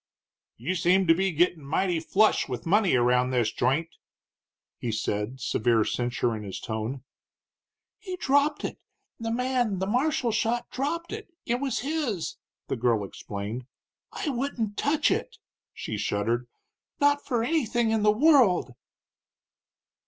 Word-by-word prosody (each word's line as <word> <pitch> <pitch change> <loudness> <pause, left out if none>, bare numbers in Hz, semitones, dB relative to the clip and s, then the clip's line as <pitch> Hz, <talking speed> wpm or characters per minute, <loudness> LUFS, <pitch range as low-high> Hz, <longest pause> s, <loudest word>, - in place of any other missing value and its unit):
"You 145 +11 -2
seem 185 +2 +3
to 165 - +6
be 190 +3 +1
gettin' 170 -1 +1
mighty 170 +4 0
flush 200 +1 +2
with 125 - -5
money 195 -1 +3
around 125 +1 +3
this 120 -4 +1
joint," 140 +7 0 0.9
he 120 - -2
said, 105 +3 -2
severe 115 -3 +2
censure 120 -1 -1
in 110 - -6
his 100 -3 -6
tone. 115 +4 -4 1.0
"He 370 -3 -6
dropped 285 -1 +2
it - - -5 0.4
the 225 0 -3
man 245 -3 0
the 190 - -1
marshal 250 +2 +1
shot 225 +2 0
dropped 335 +7 -3
it 435 -1 -6 0.2
it 240 +1 0
was 270 -4 -1
his," 260 - -2 0.3
the - - -1
girl 115 -3 +2
explained. 105 +5 -6 0.4
"I - - -3
wouldn't 240 -5 -2
touch 290 +6 +2
it!" 465 -3 -2 0.3
she 110 - -5
shuddered, 115 +4 -1 0.5
"not 285 0 +3
for 235 -3 0
anything 240 -5 +1
in 220 -1 +1
the 210 0 +5
world!" 230 - +4
190 Hz, 140 wpm, -27 LUFS, -, 1.0 s, to